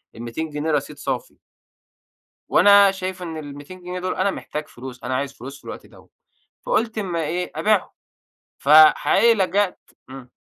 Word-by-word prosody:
ال200 120 +8 -5
جنيه 150 +2 -3
رصيد 145 -2 -2
صافي. - - -5 1.1
وأنا 200 +1 +6
شايف 185 -1 -6
إن 165 -3 -6
ال200 145 +4 -10
جنيه 180 +1 -6
دول 185 0 -3
أنا 195 +1 +1
محتاج 150 -4 -6
فلوس، 125 0 -11
أنا 130 +1 -2
عايز 140 +1 -3
فلوس 135 +2 -10
في - - -26
الوقت - - -8
دوّة. - - -19 0.6
فقُلت 225 - 0
أما 175 -5 -2
إيه، 175 +4 -3
أبيعهم. 215 -2 +1 0.7
فحقيقي 155 +10 +6
لجأت 195 -1 0 0.3
امم. 130 -2 -11
165 Hz, 150 wpm, -22 LUFS, 145-190 Hz, 1.1 s, وأنا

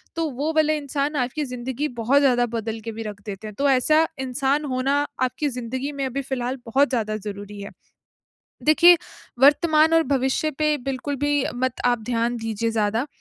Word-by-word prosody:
तो 325 -2 -1
वो 285 +5 -2
वाला 310 -1 +3
इंसान 285 0 -2
आपकी 260 +4 -1
ज़िंदगी 255 +3 -3
बहुत 265 +5 +3
ज़्यादा 245 -3 +3
बदल 225 0 -4
के 225 - -3
भी 225 - -6
रख 205 -1 -7
देते 205 0 -7
हैं। 210 - -8
तो 280 0 +3
ऐसा 305 +5 +4
इंसान 270 +3 0
होना 265 +1 0 0.3
आपकी 285 +3 -1
ज़िंदगी 255 +3 -4
में 275 -1 -3
अभी 275 +2 -3
फिलहाल 255 0 -3
बहुत 275 +5 +3
ज़्यादा 215 -4 -1
ज़रूरी 205 0 -8
है। 200 - -8 0.9
देखिए, 345 +3 +7 0.4
वर्तमान 310 +3 +5
और 330 - +5
भविष्य 270 +2 0
पे 305 -1 +2
बिल्कुल 275 +2 -3
भी 290 0 +1
मत 255 0 -2
आप 240 -1 +3
ध्यान 240 0 0
दीजिए 225 0 -2
ज़्यादा 220 +4 0
260 Hz, 175 wpm, -23 LUFS, 230-290 Hz, 0.9 s, देखिए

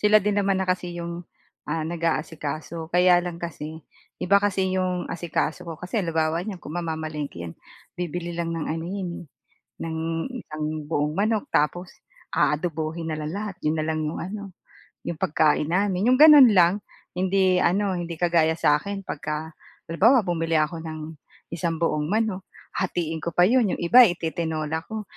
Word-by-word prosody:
Sila 210 0 +5
din 205 0 +1
naman 195 -1 +1
na 190 - 0
kasi 180 -1 -1
yung 170 0 -5 0.4
ah, 160 -1 -1
nag-aasikaso. 160 -1 -3
Kaya 180 0 +5
lang 175 -1 -5
kasi, 160 -2 -7 0.3
iba 200 +2 +3
kasi 190 -2 0
yung 185 -1 -1
asikaso 170 0 -2
ko. 165 - -5
Kasi 180 +7 -3
halimbawa 165 -2 0
niyan, 195 +1 -5
kung 160 -3 -10
mamamalengke 155 - -4
'yan, 85 - -7 0.4
bibili 175 0 -4
lang 170 0 -3
ng 160 - -3
ano 160 +1 -3
'yan 190 -1 -3
eh, - - -10 0.6
ng 160 -1 -4 0.4
isang 155 -10 -6 0.2
buong 150 0 -1
manok, 215 +1 0
tapos 175 +4 0 0.4
aadobohin 160 +1 -1
na 155 - -2
lang 155 0 -4
lahat. 205 +1 -4
Yun 155 +1 +2
na - - -1
lang 155 0 -1
yung 150 - -3
ano, 200 +2 -6 0.5
yung 165 -2 -5
pagkain 150 -1 +2
namin, 190 +3 +1
yung 255 - +5
gano'n 295 -2 +9
lang. 180 +2 +5 0.3
Hindi 185 0 +2
ano, 195 +3 +2
hindi 170 -1 -5
kagaya 165 -1 +2
sa 150 -2 +3
akin 200 +3 -5
pagka 155 0 -4 0.4
halimbawa 225 +8 +5
bumili 165 -3 -1
ako 155 +2 +1
ng 155 -1 -7 0.3
isang 170 0 -2
buong 155 -2 0
manok, 210 -1 -1 0.3
hatiin 170 -3 -2
ko 170 +1 -5
pa 175 - +5
'yon, 225 0 +3
yung - - -8
iba 240 +8 +8
ititinola 160 -2 -2
ko, 220 -1 -5
170 Hz, 165 wpm, -24 LUFS, 160-190 Hz, 0.6 s, gano'n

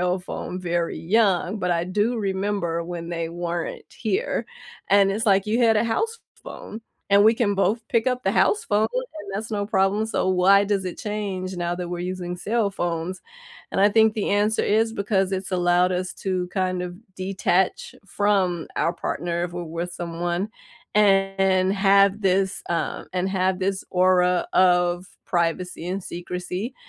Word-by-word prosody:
cell 180 +1 +1
phone 180 0 -6
very 170 -2 -1
young, 195 0 +1
but 180 -1 -1
I 170 -1 +1
do 210 +6 0
remember 195 -4 -1
when 170 -1 -6
they 165 -1 -3
weren't 170 0 -4
here, - - -2 0.4
and 195 -1 +5
it's, 220 +3 -2
like, 195 0 +3
you 220 +3 +1
had 225 -2 +4
a 210 - +2
house 450 - -1 0.2
phone, 220 - -9 0.3
and 200 +1 +6
we 225 +1 +6
can 220 -4 +1
both 215 +3 0
pick 230 +1 +1
up 250 0 0
the - - +1
house 420 - +2
phone, 210 +1 +2
and - - -5
that's 215 +3 -4
no 205 -2 -1
problem, 205 +1 +1
so, 205 -4 -1
why 190 +2 +5
does 200 -2 0
it 180 - -5
change 195 -3 -4
now 175 0 -1
that 175 -1 -5
we're 175 - -3
using 180 0 -4
cell 215 0 0
phones? 175 0 -3 0.5
And - - -1
I 205 - +6
think 220 0 +4
the 215 - -1
answer 210 +2 +2
is 225 +2 +2
because 195 -2 0
it's 190 0 -3
allowed 180 0 +3
us 180 0 -3
to 185 -2 -1
kind 185 0 -1
of 175 0 -6 0.2
detach 190 -1 0
from 195 -5 +1
our 170 - +1
partner 170 0 -2
if 175 - -6
we're 175 - -4
with 170 +2 -5
someone 175 +3 -3 0.5
and 195 -2 +3
have 200 +1 +4
this, 190 0 +1
um, 170 - -2
and 185 +1 0
have 190 -1 0
this 190 0 -1
aura 180 -1 +3
of 175 -1 +3 0.2
privacy 175 0 -1
and 185 +1 -3
secrecy. 180 +6 -5
190 Hz, 170 wpm, -24 LUFS, 180-205 Hz, 0.5 s, and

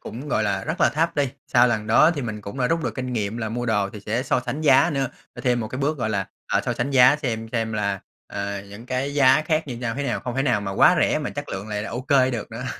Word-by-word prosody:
cũng, 135 +6 -8
gọi 110 - +1
là, 100 -2 -1
rất - - -4
là - - +5
thấp 165 +1 -1
đi. 140 -2 +2 0.2
Sau 120 +1 +5
lần 110 -2 -1
đó 140 +9 +5
thì 145 -5 -3
mình 110 -2 -5
cũng 105 +5 -8
đã 125 - +2
rút 165 +2 0
được - - -2
kinh 130 -1 -4
nghiệm 105 -1 -2
là 110 -2 -3
mua 120 +2 -3
đồ 105 -3 +1
thì 105 - -9
sẽ 110 +5 -2
so 130 - +1
sánh 130 +4 -4
giá 150 +3 +5
nữa, 135 -3 0 0.3
là - - -8
thêm 125 -2 +1
một 110 - -4
cái 130 - -6
bước, 145 +1 -1
gọi 110 -2 -1
là, 100 -2 -1 0.3
ờ, - - +3
so - - 0
sánh 140 - -2
giá 135 +1 +6
xem 115 -6 -3
xem 115 -2 -1
là, 100 -2 -1 0.3
à, 100 0 -4
những 105 +5 -11
cái 130 +3 -2
giá 140 +1 +5
khác 155 -1 0
như 120 - -5
nhau 115 -1 -3
thế 140 - -3
nào, 125 -4 -2
không 125 -1 -5
thể 135 - +2
nào 120 -7 +1
mà 100 - -4
quá - - +5
rẻ - - +2
mà - - -4
chất - - -6
lượng 95 +3 -5
lại 105 -1 -3
là 110 - -6
OK 125 +4 -6 0.2
được 115 -3 -5
nữa. 115 +3 -6
120 Hz, 300 wpm, -23 LUFS, 110-135 Hz, 0.3 s, giá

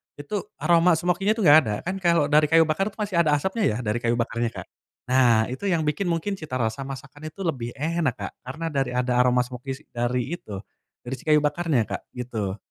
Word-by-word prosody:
itu 145 +8 -6 0.3
aroma 170 +1 +4
smoky-nya 180 +5 +1
tuh 220 - -4
gak 145 - +10
ada 105 - -1
kan 185 +2 -3
kalo 170 -5 +2
dari 150 +1 +5
kayu 165 +2 +5
bakar 195 +7 0
tuh - - -22
masih 205 -4 -2
ada 155 -3 +3
asapnya 190 +9 0
ya 105 - +1
dari 110 -1 -1
kayu 120 0 0
bakarnya 115 0 -1
Kak, - - -7 0.4
nah 120 -4 +4
itu 130 +10 -5
yang 175 -5 +2
bikin 155 +6 -1
mungkin 175 +3 -1
cita 140 -7 -4
rasa 115 +4 -2
masakan 140 +2 -9
itu 155 +5 -8
lebih 130 -10 -3
enak 155 -1 -1
Kak - - -4
karena 140 +6 -5
dari 135 -4 -1
ada 125 0 0
aroma 125 0 +4
smoky 130 +3 -6
dari 120 +1 -1
itu, 100 - -8 0.4
dari 120 - -6
si - - -16
kayu 150 -1 +4
bakarnya 150 -2 +1
Kak - - -4
gitu. 110 -6 -4
145 Hz, 210 wpm, -24 LUFS, 125-170 Hz, 0.4 s, gak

